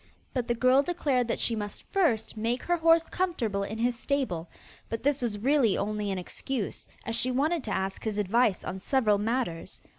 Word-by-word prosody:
But 250 -3 -1
the 240 - +1
girl 255 +3 +5
declared 280 -7 0
that - - -1
she 230 - +1
must 205 -1 -5
first 250 - +2
make 230 +3 -1
her 350 0 +1
horse 330 0 +4
comfortable 240 - -1
in 205 +2 -4
his 240 +2 +1
stable; 230 - -2 0.4
but 230 +1 -4
this 285 0 +1
was 230 -4 -1
really 250 -1 +3
only 210 0 -2
an 190 - -1
excuse, 215 +5 -4 0.2
as 230 - 0
she 250 - +3
wanted 290 +5 +1
to 220 - -3
ask 190 0 -2
his 215 -2 -2
advice 210 +1 +2
on 190 - -5
several 210 -2 +2
matters. 220 -6 -2
235 Hz, 190 wpm, -28 LUFS, 205-270 Hz, 0.4 s, girl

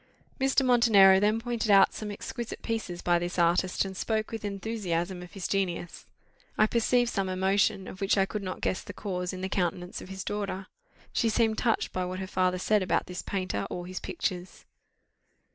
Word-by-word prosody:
Mr. 270 0 +3
Montenero 215 -6 +6
then 210 +2 +2
pointed 235 -2 -2
out 195 -1 +6
some 215 - -5
exquisite 230 +3 -6
pieces 215 -6 -3
by 175 -1 +3
this 175 +1 -4
artist, 175 +3 +2
and 190 0 -6
spoke 215 +2 -1
with 225 -2 -5
enthusiasm 195 -4 -2
of 180 - -11
his 195 -3 -4
genius. 180 -3 -2 0.5
I 215 - +6
perceived 240 +2 +2
some 195 -2 -1
emotion, 195 +1 +1
of 185 - -9
which 195 +1 +2
I 195 - +4
could 210 +1 -4
not 185 -1 -5
guess 185 - 0
the - - -9
cause, 180 -3 -3
in 185 -1 -7
the 190 - -1
countenance 180 -1 -2
of - - -10
his 190 -1 -6
daughter; 200 -2 -3 0.5
she 230 - +2
seemed 220 0 +2
touched 230 -2 0
by 185 0 -1
what 185 +1 -4
her 190 - -4
father 185 -1 +1
said 210 +3 +2
about 185 - +1
this 180 0 -6
painter 185 - -2
or 175 - -5
his 185 +1 -5
pictures. 180 0 -4
195 Hz, 195 wpm, -28 LUFS, 185-215 Hz, 0.5 s, Montenero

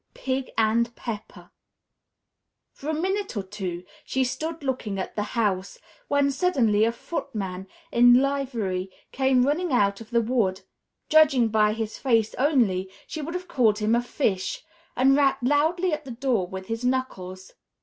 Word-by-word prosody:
VI - - -17
PIG 265 0 -1
AND 230 +2 +2
PEPPER 220 -3 -8 1.2
For 290 - -7
a - - 0
minute 380 - -2
or 200 - -1
two 190 -3 -5 0.2
she 265 - 0
stood 315 +5 -4
looking 250 -7 -2
at 190 - -5
the 210 - -1 0.2
house, 195 -4 0 0.3
when 285 0 +2
suddenly 255 - +2
a 230 - +2
footman 195 - -5 0.2
in 245 +1 +7
livery 245 -9 0 0.2
came 265 -1 +3
running 315 +4 0
out 200 -4 +2
of 220 - -11
the 235 -1 +2
wood 215 -6 0 0.5
(judging 280 -7 +5
by 210 -1 +3
his 220 -1 -4
face 225 -5 +2
only, 230 -10 +2 0.2
she 315 - -6
would 330 +4 -5
have 360 0 -5
called 225 -9 +2
him 215 +1 +1
a 235 - +3
fish) 245 - -2 0.3
and 270 +1 +4
rapped 275 -2 +2
loudly 315 +6 +2
at 305 0 -3
the 270 - -10
door 235 -6 0
with 190 +1 -7
his 225 +3 -4
knuckles. 190 -8 -3
245 Hz, 160 wpm, -25 LUFS, 210-280 Hz, 1.2 s, in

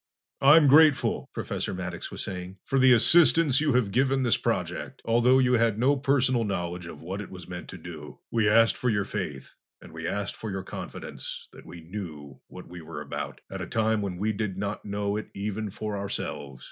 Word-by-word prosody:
"I'm 150 +3 +7
grateful," 150 0 +4
Professor - - -3
Maddox 90 -1 -5
was - - -5
saying, 90 0 -6
"for 135 - +1
the 130 0 +6
assistance 150 +3 +5
you 150 -3 +2
have 120 -5 +2
given 135 +3 +2
this 120 - +3
project, - - -3
although 120 +3 +4
you 125 -1 +3
had 115 -3 +2
no 130 +5 +3
personal 130 -3 +2
knowledge 90 -4 -3
of 85 - -10
what 95 +4 -4
it 105 - -8
was 90 -3 -10
meant 90 -1 -7
to - - -8
do. 80 -3 -10
We 110 -3 +2
asked 115 +1 +4
for 125 - 0
your 105 -3 +1
faith 85 -11 -5 0.3
and - - -14
we 80 +1 -5
asked 100 +2 -3
for 110 - -6
your 95 -1 -4
confidence - - -7
that - - -14
we 85 -1 -10
knew 80 -7 -8
what - - -11
we 85 0 -10
were 80 - -8
about, - - -6
at - - -5
a - - -5
time 110 -1 +1
when 95 -3 -4
we 105 +3 0
did 100 -3 -3
not 100 +1 -3
know 100 0 -2
it 110 - -6
even 105 +1 -3
for 105 +2 -5
ourselves. 70 -8 -5
105 Hz, 205 wpm, -27 LUFS, 90-125 Hz, 0.3 s, I'm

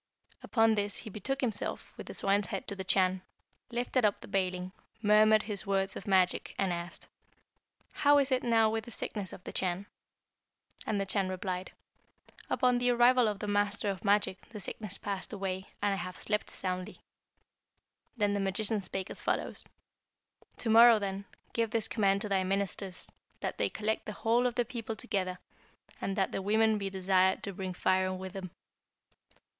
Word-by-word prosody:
Upon 225 -2 +3
this 205 -1 0
he 220 - -5
betook 265 +8 -3
himself, 225 -5 -2
with - - -9
the - - -6
swine's 200 0 +2
head 195 - -4
to 200 - 0
the 190 - -5
Chan, 185 -1 +2 0.5
lifted 245 +1 0
up 210 -1 +2
the - - -11
baling, 185 -2 -1 0.3
murmured 215 +1 +6
his 205 -1 -5
words 195 -1 +1
of - - -8
magic, 185 -2 +2
and 190 -2 +1
asked, 170 0 -5 0.9
'How 290 0 +5
is 280 -1 +2
it 255 -1 +3
now 225 -2 +4
with 220 0 -1
the - - -9
sickness 205 -4 -4
of 180 - -11
the - - -7
Chan?' 185 +1 -1 1.0
And 210 - 0
the 195 - 0
Chan 195 0 0
replied, 185 0 -4 0.8
'Upon 250 -2 +3
the 245 0 +2
arrival 245 0 +5
of 210 -1 -1
the 210 - -5
master 205 0 +1
of 190 - -7
magic 200 -2 +1
the 215 - -8
sickness 200 +1 -3
passed 200 +1 -4
away, 190 -1 -4
and 205 -1 +3
I - - -2
have 185 -1 -6
slept 210 0 -1
soundly.' 185 -1 -5 1.2
Then 205 -2 +2
the 205 - 0
magician 205 +2 0
spake 190 0 -4
as - - -8
follows: - - -2 0.9
'To - - 0
morrow, 230 0 +9
then, 200 -1 -3 0.3
give 230 -1 +1
this 225 0 0
command 200 -3 +2
to 215 - -1
thy 190 -1 +2
ministers, 195 -1 -2 0.3
that - - -3
they - - +2
collect 220 +1 -2
the 210 - -4
whole 235 +2 +2
of 240 - -3
the 245 - +1
people 230 -2 -5
together, 190 -5 -2 0.6
and 195 - -2
that 190 - +1
the - - -2
women 215 +2 +3
be 195 -1 -2
desired 190 0 +2
to 200 - -4
bring 185 -1 -5
firing 185 +1 +1
with 190 0 -7
them.' 190 -2 -6
200 Hz, 180 wpm, -31 LUFS, 190-220 Hz, 1.2 s, morrow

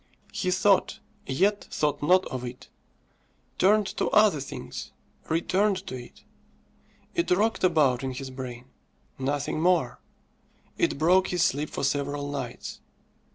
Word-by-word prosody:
He 190 -3 -1
thought, 190 +2 +3 0.3
yet 200 +10 +1
thought 150 -1 -1
not 180 +5 +4
of 130 -1 -5
it; 125 0 -8 0.9
turned 210 +2 +4
to - - +1
other 210 -7 +4
things 70 - -7 0.4
returned 190 +4 +1
to - - -6
it. 120 -1 -11 0.9
It 340 - 0
rocked 210 +5 +2
about 145 -8 +3
in 130 -1 -2
his 130 +1 -6
brain 125 -2 -7 0.5
nothing 145 +3 -1
more. 165 -8 +2 0.8
It - - 0
broke 180 +5 +4
his 175 -2 +1
sleep 155 -5 0
for - - -5
several 145 +1 -1
nights. 125 -4 -6
150 Hz, 130 wpm, -27 LUFS, 130-185 Hz, 0.9 s, not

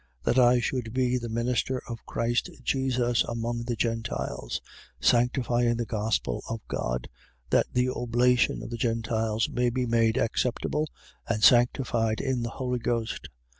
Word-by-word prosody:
That 130 - +3
I 125 0 +6
should 120 -1 -2
be 125 -1 +2
the 120 -1 -5
minister 120 +3 0
of 115 -1 -7
Christ 120 +1 0
Jesus 125 -3 +1
among 115 0 -3
the 120 -1 -1
Gentiles: 115 - -2 0.4
sanctifying 120 - +2
the 120 - -1
gospel 105 - -1
of 115 -1 -5
God, - - -2 0.4
that - - +4
the 125 0 +2
oblation 125 0 +2
of - - -7
the 120 - -3
Gentiles 115 -1 0
may 125 0 +1
be 125 +1 -1
made 115 -1 +2
acceptable 125 +6 0 0.4
and 110 -2 0
sanctified 120 -1 +4
in 130 -3 -1
the 115 - -2
Holy 125 0 -2
Ghost. 115 -1 -2
120 Hz, 145 wpm, -27 LUFS, 115-125 Hz, 0.4 s, I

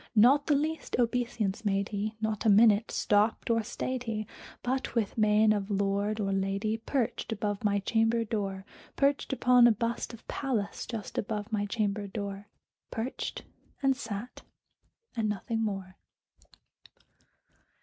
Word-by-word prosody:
Not 265 +7 +6
the 300 - +4
least 310 +2 -1
obeisance 235 -3 0
made 200 -1 0
he; 215 +1 -3
not 220 -1 -2
a 225 - +4
minute 215 +1 +6
stopped 210 +3 +2
or 230 0 +3
stayed 250 +3 -4
he; 215 -2 -2 0.4
But, 260 +1 -2
with 220 -4 0
mien 215 0 +4
of 205 -1 -2
lord 200 +1 0
or 195 -2 0
lady, 195 +3 0
perched 240 0 -2
above 205 -1 -2
my 205 -1 +2
chamber 225 +3 +2
door 195 -3 -3 0.3
Perched 280 0 +1
upon 250 -2 +6
a - - +6
bust 230 +2 -2
of 230 - -13
Pallas 230 -8 -2
just 225 -3 -4
above 210 +1 -3
my 205 -1 0
chamber 205 -1 -1
door 200 0 -5 0.4
Perched, 230 +4 -4 0.4
and 270 -1 +4
sat, 230 -2 -6 0.7
and 220 -2 0
nothing 225 +2 -2
more. 195 -3 -4
215 Hz, 140 wpm, -29 LUFS, 205-235 Hz, 0.7 s, Not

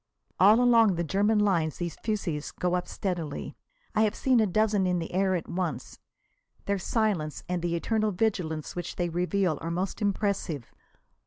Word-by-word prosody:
All 210 +5 +7
along 230 -5 +5
the 170 - -1
German 205 +6 +2
lines 175 -7 +1
these 170 -2 -4
fusées 175 -9 -3
go 180 0 0
up 180 0 -1
steadily. 170 -7 -4 0.4
I 215 - +2
have 215 -1 +2
seen 255 -3 +3
a 215 - +3
dozen 205 0 +2
in 180 0 +1
the 165 0 -5
air 190 0 +2
at 170 - -3
once. 175 -3 -4 0.7
Their 200 -1 0
silence 185 -7 -1
and 180 -1 -2
the 170 0 -1
eternal 215 +5 0
vigilance 180 -6 -1
which 175 - -5
they 175 -1 -1
reveal 180 0 0
are 165 - -3
most 180 +5 -3
impressive. 200 - -1
185 Hz, 170 wpm, -28 LUFS, 170-210 Hz, 0.7 s, All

